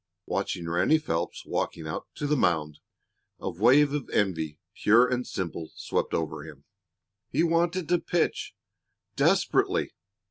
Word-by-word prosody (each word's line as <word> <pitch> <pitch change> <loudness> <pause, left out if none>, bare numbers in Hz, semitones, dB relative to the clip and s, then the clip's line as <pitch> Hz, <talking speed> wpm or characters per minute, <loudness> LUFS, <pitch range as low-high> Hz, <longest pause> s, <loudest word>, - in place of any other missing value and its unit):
Watching 85 -1 -2
Ranny 90 - +3
Phelps 85 - -3
walking 80 - -2
out 80 +1 -5
to 145 - -4
the 150 +1 +2
mound, 80 - +1 0.6
a - - -3
wave 130 - +4
of 150 -3 -3
envy, 80 -7 0 0.2
pure 115 +4 +5
and 125 0 -2
simple, 85 -3 -4
swept - - -2
over 80 -2 -3
him. 75 -3 -12 0.7
He 155 +5 +1
wanted 170 +1 +1
to 175 0 +3
pitch 175 0 -1 0.6
desperately. - - +2
105 Hz, 135 wpm, -27 LUFS, -, 0.7 s, pure